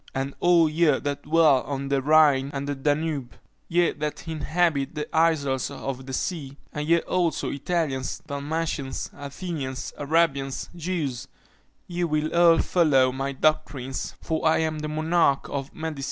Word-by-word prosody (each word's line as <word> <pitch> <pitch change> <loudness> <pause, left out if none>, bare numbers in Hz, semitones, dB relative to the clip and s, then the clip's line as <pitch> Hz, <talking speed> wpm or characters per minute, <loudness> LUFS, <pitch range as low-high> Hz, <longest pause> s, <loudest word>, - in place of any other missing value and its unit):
and 135 +1 -2
all 175 -2 +5
ye 160 +3 +2
that 145 0 -3
dwell 150 -3 +4
on 140 0 -4
the 140 -1 +1
Rhine 145 -2 +4
and 140 +1 -3
the 145 - -1
Danube, 145 -1 -1 0.3
ye 175 0 +2
that 150 +2 -5
inhabit 155 -2 0
the 150 - -3
isles 145 -5 +2
of 130 -1 -6
the - - -5
sea; 140 -2 -3 0.2
and 150 0 -3
ye 170 0 +4
also, 175 -3 0
Italians, 140 -3 -2
Dalmatians, 145 -1 -3
Athenians, 140 -2 -5
Arabians, 140 -3 0
Jews, 160 -8 -3 0.6
ye 175 0 -3
will 155 -1 0
all 170 -1 +6
follow 140 -9 +3
my 135 +1 -3
doctrines, 135 -2 -1
for 160 -1 -2
I 160 - +4
am 160 -1 -1
the 155 - -3
monarch 155 -2 +1
of 135 -1 -4
medicine!" 160 -2 -4
150 Hz, 150 wpm, -25 LUFS, 135-165 Hz, 0.6 s, all